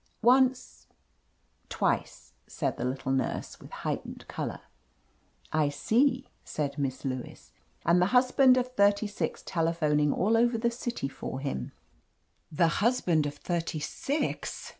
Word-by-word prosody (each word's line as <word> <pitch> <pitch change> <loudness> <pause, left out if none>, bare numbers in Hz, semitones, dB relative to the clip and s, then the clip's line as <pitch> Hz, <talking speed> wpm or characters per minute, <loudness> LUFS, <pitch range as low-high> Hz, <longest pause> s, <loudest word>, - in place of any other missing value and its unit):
"Once 255 +1 +3 0.4
— - - -42
^twice," - - -1 0.2
said - - -2
the - - -4
little 130 +1 -2
nurse, 135 -1 -2
with - - -12 0.2
heightened - - -4
color. - - -5 0.9
"I 155 -2 +3
see," 235 - +2 0.2
said 145 -1 -3
Miss 135 -1 -2
Lewis. 130 -2 -5 0.3
"And 175 +1 +4
the 180 - +4
hus 250 +3 +3
band 260 -2 +6
of 250 0 0
thirty 205 -1 +3
six 205 0 -3
telephoning 155 -3 +1
all 215 +9 +2
over 235 +1 +3
the 235 +1 +1
city 235 - -3
for 135 -1 -6
him." 135 - -4 0.8
"The 165 +2 +3
husband 180 -10 +2
of 145 - -6
thirty 170 0 -3
six!" 280 - -3
170 Hz, 140 wpm, -29 LUFS, 145-240 Hz, 0.9 s, band